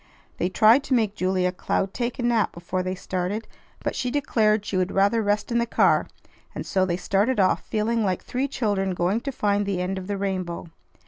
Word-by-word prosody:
They 180 - +1
tried 225 +7 +5
to 265 - +2
make 220 -4 +1
Julia 185 -2 0
Cloud 190 +1 -2
take 240 +1 -2
a 250 - -3
nap 235 -3 +2
before 175 +2 -3
they 185 +1 -3
started, 185 +4 -3 0.4
but - - -2
she 250 - -1
declared 220 -6 +1
she 200 - -3
would 185 0 +1
rather 200 +4 +3
rest 205 +2 0
in 235 - +2
the 235 - 0
car; - - +3 0.5
and - - -5
so 185 -1 +1
they 175 -1 0
started 205 +6 +1
off, 185 -1 +3
feeling 225 +1 0
like 185 -3 -1
three 260 +3 -2
children 200 -8 -1
going 185 +6 0
to 275 - -3
find 205 -4 +1
the 200 -2 -2
end 185 +1 -2
of 185 - -8
the 205 -1 -2
rainbow. 185 -3 -3
200 Hz, 210 wpm, -24 LUFS, 185-230 Hz, 0.5 s, tried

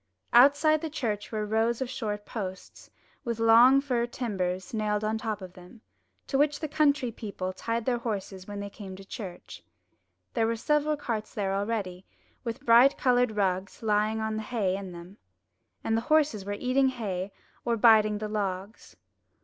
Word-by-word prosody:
Outside 285 +5 +6
the 320 - -3
church 220 -9 -3
were 215 -1 -2
rows 225 +2 +1
of 260 - -2
short 210 -4 -4
posts, 190 -4 -7 0.3
with 235 -2 -3
long 230 +3 +7
rough 275 - +3
fir 245 -4 0
timbers 190 -7 -3
nailed 210 -1 -1
on 215 +1 0
the - - -9
top 215 -4 -3
of 180 -1 -9
them, 180 +5 -15 0.4
to 270 - -1
which 290 0 +2
the 310 - -3
country 290 -4 +2
people 200 -4 -5
tied 230 +4 -3
their 245 -2 +1
horses 195 -5 -5
when 205 0 -6
they 200 - -5
came 195 -3 -9
to 195 +1 -12
church. 190 -4 -8 0.7
There 225 -2 +1
were 230 - 0
several 300 +5 +1
carts 230 -7 -4
there 195 -2 -1
already, 195 -3 -3 0.4
with 230 -2 -5
bright 240 +4 +6
coloured 245 -3 +2
rugs 190 +1 -1
lying 215 0 +1
on 220 0 -2
the - - -2
hay 210 -5 -1
in 195 -1 -6
them; 175 +3 -11 0.7
and 225 - 0
the 225 - +1
horses 300 -10 +2
were 205 - -3
eating 255 +5 +2
hay 200 -6 -4 0.3
or 235 -1 0
biting 215 -2 +5
the 215 0 -4
logs. 200 0 -4
220 Hz, 180 wpm, -28 LUFS, 200-245 Hz, 0.7 s, long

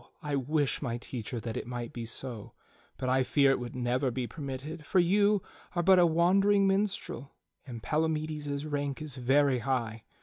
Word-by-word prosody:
I 145 -1 -1
wish, 140 +1 0
my 120 -5 -2
teacher, 120 -1 -5
that 115 -1 -5
it - - -4
might 120 -1 -5
be 120 -1 -5
so; 115 -1 -6 0.4
but 130 - -3
I 130 +1 +3
fear 140 +1 +4
it 135 - +1
would 120 0 -6
never 125 +2 0
be 125 0 -2
permitted, 145 +3 -6
for 185 - -1
you 200 +3 +4 0.3
are 175 - +1
but 190 +1 +6
a 175 - +6
wandering 195 +5 +4
minstrel 195 - -1 0.3
and 115 -3 -7
Palamides's 155 -2 -1
rank 145 -2 -2
is 155 -3 -5
very 130 +1 +3
high. 115 -3 -2
140 Hz, 175 wpm, -30 LUFS, 125-160 Hz, 0.4 s, but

